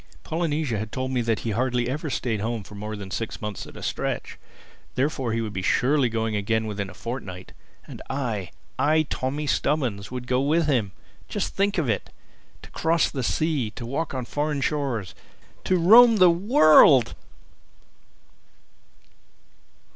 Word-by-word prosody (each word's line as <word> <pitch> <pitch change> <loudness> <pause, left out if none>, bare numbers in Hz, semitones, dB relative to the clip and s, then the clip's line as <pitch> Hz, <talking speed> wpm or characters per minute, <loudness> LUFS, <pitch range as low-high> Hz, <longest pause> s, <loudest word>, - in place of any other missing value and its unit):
Polynesia 155 -8 -1
had 110 0 -5
told 130 0 -3
me 125 -2 0
that 115 -2 -1
he 115 - -2
hardly 120 +2 0
ever 150 +4 -3
stayed 115 -5 -2
at - - -5
home 115 -1 -2
for 105 - -13
more 105 +1 -6
than 100 -2 -8
six 115 +2 -4
months 105 -2 -6
at - - -12
a - - -9
stretch. - - -3 0.6
Therefore 135 -3 -1
he 115 +1 -1
would 110 -2 -4
be 95 - -3
surely 130 +6 +2
going 110 -1 -2
again 110 +2 0
within 100 -2 -4
a - - -12
fortnight. 105 -7 -7 0.3
And - - -10
I—I, 135 - -1
Tommy 140 +4 -2
Stubbins, 125 -8 -1
would 125 -1 -6
go 125 +1 +1
with 155 +4 +2
him! 120 -9 +1 0.4
Just 85 - -2
to - - -18
think 200 0 0
of 160 -6 0
it!—to 110 -4 -7
cross 165 0 +1
the 135 - -3
Sea, 145 -2 0
to 120 - -6
walk 140 +4 -3
on 130 -2 -3
foreign 145 +2 -2
shores, 135 - -2 0.5
to 185 - +2
roam 225 +7 +7
the 180 -3 +7
World! 165 - +6
130 Hz, 160 wpm, -24 LUFS, 110-150 Hz, 0.6 s, roam